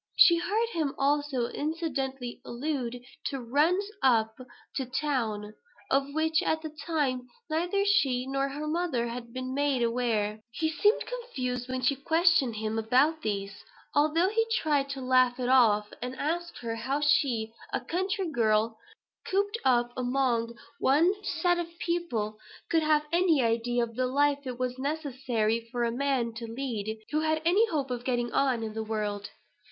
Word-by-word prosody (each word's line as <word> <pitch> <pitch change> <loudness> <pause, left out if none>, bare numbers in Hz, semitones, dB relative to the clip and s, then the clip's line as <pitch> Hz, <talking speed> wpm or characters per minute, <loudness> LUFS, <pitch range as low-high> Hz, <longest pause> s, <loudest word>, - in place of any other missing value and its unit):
She 340 - +7
heard 440 +6 0
him 315 -9 -2
also 280 -3 +1
incidentally 270 -5 -3
allude 245 -2 -3 0.2
to 275 - -2
"runs 300 - +2 0.2
up 220 -4 +3 0.4
to 265 - -1
town," 235 -7 -2 0.4
of 275 +1 +2
which, 315 0 +2
at 315 0 0
the 315 - -5
time, 290 -5 -2 0.2
neither 355 +5 +1
she 270 -12 +2
nor 275 +1 -1
her 290 +2 -5
mother 305 -7 -1
had 235 0 -7
been 255 +1 -4
made 280 -3 +1
aware. 230 -3 0
He 315 +7 -1
seemed 415 +7 +2
confused 255 - -4
when 255 0 -2
she 255 +3 +2
questioned 320 -3 +3
him 220 +1 -2
about 265 +8 +3
these, 200 -3 -3 0.3
although 310 +5 +3
he 450 +2 +2
tried 295 -9 +1
to 275 -1 -4
laugh 255 -1 +3
it 250 0 -1
off; 215 -5 +4
and 250 +1 -4
asked 340 +5 -2
her 230 -1 -3
how 265 +5 -1
she, 245 -6 +2 0.2
a - - 0
country 375 +2 -2
girl, 220 -5 +1 0.5
cooped 405 +4 0
up 240 -2 +3
among 245 -2 0 0.2
one 315 +8 +4
set 350 -3 +1
of 335 0 -6
people, 240 -14 -2 0.3
could 325 -1 +4
have 305 -1 +2
any 335 -5 +3
idea 235 +1 +1
of 230 -1 -5
the 255 +1 +1
life 285 +1 +1
it 250 -1 -4
was 255 0 -2
necessary 260 -6 -1
for 245 -1 -1
a 235 - +1
man 255 -2 0
to 230 0 -7
lead 225 -4 -3
who 305 - +2
"had 315 0 +1
any 395 +7 +4
hope 285 - -2
of 245 -1 -3
getting 240 -2 -1
on 255 -4 +2
in 220 -1 -4
the 220 0 -3
world." 210 -2 -3
265 Hz, 165 wpm, -28 LUFS, 235-315 Hz, 0.5 s, She